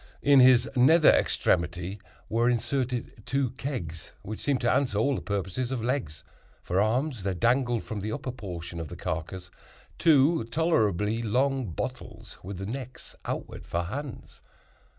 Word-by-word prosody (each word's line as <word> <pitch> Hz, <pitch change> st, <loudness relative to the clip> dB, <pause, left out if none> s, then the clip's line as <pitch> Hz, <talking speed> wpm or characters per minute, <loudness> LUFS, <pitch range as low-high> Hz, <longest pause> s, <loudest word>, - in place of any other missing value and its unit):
In 140 Hz, -2 st, +7 dB
its 125 Hz, -1 st, +6 dB
nether 155 Hz, +6 st, +6 dB
extremity 90 Hz, +4 st, 0 dB, 0.3 s
were 115 Hz, +2 st, +2 dB
inserted 125 Hz, 0 st, -2 dB
two 135 Hz, -2 st, 0 dB
kegs, 125 Hz, -, -5 dB
which 110 Hz, +2 st, -6 dB
seemed 140 Hz, -3 st, 0 dB
to 120 Hz, -, +2 dB
answer 125 Hz, -7 st, +1 dB
all 140 Hz, +7 st, +2 dB
the -, -, -3 dB
purposes 100 Hz, +5 st, -3 dB
of 125 Hz, -4 st, -2 dB
legs. 120 Hz, -, -2 dB, 0.4 s
For 90 Hz, +2 st, +1 dB
arms 125 Hz, +3 st, 0 dB
there 95 Hz, 0 st, -2 dB
dangled 120 Hz, +3 st, +1 dB
from 110 Hz, -, -5 dB
the 105 Hz, +2 st, -3 dB
upper 130 Hz, +1 st, -4 dB
portion 90 Hz, -8 st, -7 dB
of 80 Hz, -, -4 dB
the -, -, -8 dB
carcass 90 Hz, +3 st, -5 dB, 0.5 s
two 150 Hz, -2 st, +4 dB
tolerably 115 Hz, -, +1 dB
long 130 Hz, +3 st, +1 dB
bottles, 80 Hz, -, -6 dB
with 95 Hz, +1 st, -7 dB
the 95 Hz, -, -5 dB
necks 130 Hz, +3 st, -7 dB
outward -, -, -5 dB
for 85 Hz, +1 st, -1 dB
hands. 135 Hz, +9 st, -7 dB
115 Hz, 150 wpm, -27 LUFS, 95-130 Hz, 0.5 s, In